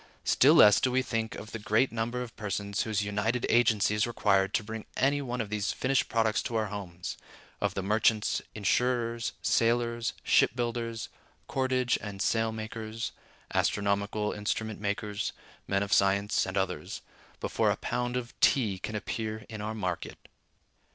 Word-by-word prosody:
Still -, -, +5 dB
less 105 Hz, -1 st, +8 dB
do 130 Hz, -, +3 dB
we 130 Hz, +1 st, +2 dB
think 115 Hz, -3 st, -2 dB
of 110 Hz, -, -8 dB
the 115 Hz, -, -5 dB
great 105 Hz, +5 st, +2 dB
number 120 Hz, +2 st, -2 dB
of 115 Hz, -3 st, -10 dB
persons 100 Hz, -1 st, -2 dB
whose 105 Hz, -2 st, 0 dB
united 105 Hz, +4 st, 0 dB
agency 110 Hz, -3 st, +4 dB
is 105 Hz, +2 st, +1 dB
required 100 Hz, -4 st, +2 dB
to 110 Hz, -, +1 dB
bring 110 Hz, 0 st, -6 dB
any 140 Hz, +2 st, +2 dB
one 125 Hz, -2 st, -4 dB
of 110 Hz, -3 st, -3 dB
these 105 Hz, -1 st, 0 dB
finished 130 Hz, -1 st, 0 dB
products 110 Hz, -2 st, +2 dB
to 120 Hz, -, -4 dB
our 110 Hz, -2 st, 0 dB
homes—of 90 Hz, -4 st, -6 dB
the 95 Hz, -, -2 dB
merchants, 110 Hz, +1 st, +2 dB
insurers, 115 Hz, +2 st, 0 dB
sailors, 115 Hz, 0 st, +1 dB
ship -, -, +4 dB
builders, 115 Hz, -2 st, -3 dB, 0.4 s
cordage 130 Hz, -2 st, +1 dB
and 100 Hz, -2 st, -6 dB
sail 110 Hz, +1 st, +1 dB
makers, 110 Hz, 0 st, -5 dB, 0.4 s
astronomical 100 Hz, +1 st, 0 dB
instrument 110 Hz, +1 st, -3 dB
makers, 105 Hz, 0 st, -2 dB, 0.3 s
men 100 Hz, 0 st, +1 dB
of 100 Hz, -, -1 dB
science, 100 Hz, +2 st, +3 dB
and 95 Hz, +1 st, -3 dB
others, 95 Hz, -1 st, -2 dB, 0.4 s
before -, -, +1 dB
a -, -, +1 dB
pound 125 Hz, 0 st, -2 dB
of 120 Hz, -1 st, -5 dB
tea 105 Hz, -8 st, +3 dB
can 110 Hz, -, -5 dB
appear 110 Hz, +1 st, -4 dB
in 110 Hz, -2 st, -6 dB
our 110 Hz, +1 st, -3 dB
market." 90 Hz, -5 st, -4 dB
110 Hz, 160 wpm, -29 LUFS, 105-120 Hz, 0.4 s, less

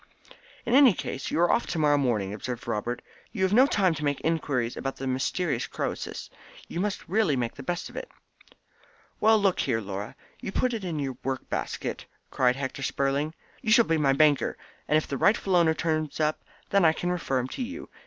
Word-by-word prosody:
"In 235 Hz, -, 0 dB
any 265 Hz, -4 st, +8 dB
case 135 Hz, -, -4 dB
you -, -, -1 dB
are 175 Hz, -, +4 dB
off 235 Hz, -, +1 dB
to 175 Hz, -, -3 dB
morrow 150 Hz, -2 st, +4 dB
morning," 110 Hz, -7 st, 0 dB
observed 120 Hz, +3 st, -5 dB
Robert. 120 Hz, +3 st, -2 dB, 0.3 s
"You 195 Hz, -5 st, -2 dB
have 190 Hz, +1 st, +2 dB
no 255 Hz, +5 st, +7 dB
time 190 Hz, -9 st, +2 dB
to 155 Hz, -1 st, -6 dB
make 145 Hz, -1 st, 0 dB
inquiries 140 Hz, -7 st, 0 dB
about 135 Hz, 0 st, -3 dB
the 135 Hz, -, -6 dB
mysterious 130 Hz, +2 st, -1 dB
Croesus. -, -, -4 dB, 0.4 s
You 170 Hz, -, -5 dB
must 205 Hz, +1 st, -2 dB
really 190 Hz, -5 st, +2 dB
make 120 Hz, -2 st, -2 dB
the -, -, -9 dB
best 175 Hz, +5 st, -3 dB
of -, -, -14 dB
it." -, -, -6 dB, 1.1 s
"Well, 220 Hz, +1 st, +5 dB
look 200 Hz, -3 st, +2 dB
here, 120 Hz, -4 st, +1 dB
Laura, 100 Hz, 0 st, -6 dB, 0.2 s
you -, -, -5 dB
put 250 Hz, +4 st, +1 dB
it 220 Hz, -3 st, -3 dB
in 170 Hz, -4 st, -3 dB
your 135 Hz, -3 st, -3 dB
work 130 Hz, 0 st, -3 dB
basket," -, -, -4 dB, 0.2 s
cried 125 Hz, -1 st, +3 dB
Hector 135 Hz, 0 st, -4 dB
Spurling. 140 Hz, +3 st, -1 dB, 0.3 s
"You 220 Hz, -, -1 dB
shall 235 Hz, 0 st, +7 dB
be 165 Hz, -, +1 dB
my 140 Hz, -2 st, +3 dB
banker, 145 Hz, 0 st, +3 dB, 0.3 s
and 155 Hz, -, +4 dB
if 155 Hz, -, 0 dB
the 140 Hz, -, -3 dB
rightful 200 Hz, -3 st, +3 dB
owner 165 Hz, -2 st, +4 dB
turns 155 Hz, -3 st, -1 dB
up 155 Hz, 0 st, 0 dB, 0.3 s
then 200 Hz, -1 st, +4 dB
I 160 Hz, -1 st, +6 dB
can 175 Hz, +2 st, -2 dB
refer 165 Hz, -7 st, -1 dB
him 125 Hz, 0 st, -1 dB
to -, -, -6 dB
you. 255 Hz, +2 st, -5 dB
155 Hz, 210 wpm, -27 LUFS, 130-185 Hz, 1.1 s, any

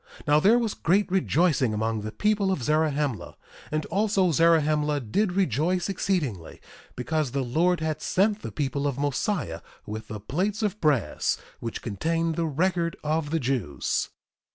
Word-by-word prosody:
Now, 150 Hz, 0 st, +4 dB
there 210 Hz, +8 st, +5 dB
was 230 Hz, -4 st, 0 dB
great 195 Hz, +3 st, +1 dB
rejoicing 165 Hz, -, +2 dB
among 110 Hz, 0 st, -1 dB
the 110 Hz, +1 st, -5 dB
people 205 Hz, -, +1 dB
of 155 Hz, -10 st, -2 dB
Zarahemla; 150 Hz, -, 0 dB, 0.3 s
and 155 Hz, 0 st, -2 dB
also 195 Hz, -1 st, +1 dB
Zarahemla 150 Hz, -2 st, +3 dB
did 180 Hz, -, 0 dB
rejoice 180 Hz, -, +1 dB
exceedingly, 150 Hz, -, -2 dB, 0.4 s
because 140 Hz, +1 st, -1 dB
the 140 Hz, -1 st, 0 dB
Lord 165 Hz, +8 st, +1 dB
had 155 Hz, -1 st, -2 dB
sent 205 Hz, +2 st, +1 dB
the -, -, -6 dB
people 140 Hz, 0 st, -1 dB
of 135 Hz, -2 st, -2 dB
Mosiah 140 Hz, -, -1 dB, 0.2 s
with 110 Hz, +1 st, -6 dB
the 110 Hz, -, -6 dB
plates 190 Hz, -, -2 dB
of 210 Hz, 0 st, -2 dB
brass 140 Hz, -, +1 dB, 0.2 s
which 115 Hz, -1 st, -5 dB
contained 165 Hz, -, -1 dB
the 165 Hz, 0 st, 0 dB
record 170 Hz, +2 st, 0 dB
of 155 Hz, 0 st, -1 dB
the 165 Hz, +1 st, 0 dB
Jews. 120 Hz, -, -1 dB
155 Hz, 155 wpm, -26 LUFS, 130-185 Hz, 0.4 s, there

